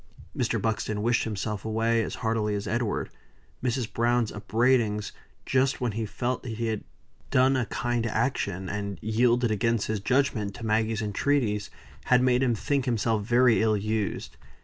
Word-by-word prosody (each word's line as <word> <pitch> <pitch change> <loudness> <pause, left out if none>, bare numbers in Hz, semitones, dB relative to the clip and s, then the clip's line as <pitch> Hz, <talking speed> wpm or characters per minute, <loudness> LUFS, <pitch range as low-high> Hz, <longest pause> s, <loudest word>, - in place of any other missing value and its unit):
Mr. - - 0
Buxton 110 -1 -1
wished 120 +1 +2
himself 105 -1 -3
away 115 +1 +1
as - - -3
heartily 110 -2 +1
as 100 - -3
Edward. 115 -1 -1 0.5
Mrs. 125 -2 -1
Browne's 120 -1 +1
upbraidings, 110 0 +1 0.3
just 130 +1 +1
when 125 -3 0
he 110 +1 -3
felt 120 +4 -2
that 120 -3 -6
he 115 +1 -2
had 110 -2 -3 0.5
done 130 +1 +4
a 125 -5 0
kind 120 0 -1
action, 110 -5 -1
and 100 -1 -4
yielded, 120 +2 +2
against 115 +1 +1
his 110 -1 -2
judgment, 110 -3 0
to 120 - -7
Maggie's 110 0 +1
entreaties, 105 -1 0 0.4
had 125 0 +4
made 125 0 +3
him 125 -3 +2
think 140 +4 -1
himself 115 -3 +1
very 120 +1 +4
ill 110 -1 +3
used. 105 -1 -3
115 Hz, 160 wpm, -27 LUFS, 105-125 Hz, 0.5 s, done